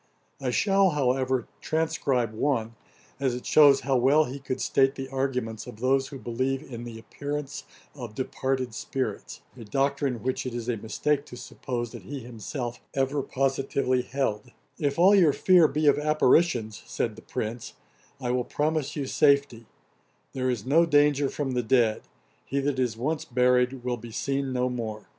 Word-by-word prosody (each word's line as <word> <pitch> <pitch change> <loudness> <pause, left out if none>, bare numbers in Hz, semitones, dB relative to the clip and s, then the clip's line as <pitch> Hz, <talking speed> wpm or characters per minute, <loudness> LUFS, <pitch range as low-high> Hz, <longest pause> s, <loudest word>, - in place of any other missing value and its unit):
I 130 - -1
shall, 195 - +3
however, 130 -4 0
transcribe 145 -8 0
one, 115 -2 -1 0.5
as 130 -3 0
it 125 - -7
shews 145 -3 +6
how 135 -2 +1
well 140 +5 +4
he 135 +1 -6
could 130 -1 -4
state 135 +1 +2
the 135 -1 -5
arguments 125 -5 -2
of 105 - -10
those 135 +2 +2
who 140 - -8
believe 130 +3 -2
in 120 -5 -8
the 115 -1 -8
appearance 145 +4 -6 0.3
of 120 -6 -8
departed 130 -2 -2
spirits; 130 +2 -4
a 120 - -10
doctrine 135 0 -1
which 130 0 -1
it 120 - -5
is 120 -1 -5
a 120 - 0
mistake 140 +7 -1
to 125 - -10
suppose 120 -2 -5
that - - -9
he 140 -1 -7
himself 120 +1 -6
ever 135 +1 0
positively 135 -1 0
held: 125 -4 -2 0.3
'If 145 -1 0
all 185 +4 +6
your 175 -8 +5
fear 180 -1 +5
be 150 +2 -1
of 145 0 +5
apparitions, 150 -6 +2
(said 115 -3 -2
the 110 - -12
Prince,) 110 +2 -5 0.5
I 125 -2 -2
will 125 0 +1
promise 150 +1 -1
you 145 - -2
safety: 140 -5 +2 0.7
there 130 -1 -1
is 120 -5 -2
no 165 +6 +4
danger 145 -2 +3
from 140 -3 -3
the 125 -1 0
dead; 115 -2 +2 0.4
he 140 - -2
that 140 -1 -1
is 120 -3 0
once 150 +6 -1
buried 125 +1 +2
will 125 -1 -1
be 115 0 -10
seen 135 +3 -2
no 125 0 0
more. 115 -4 -4
130 Hz, 170 wpm, -26 LUFS, 120-140 Hz, 0.7 s, shews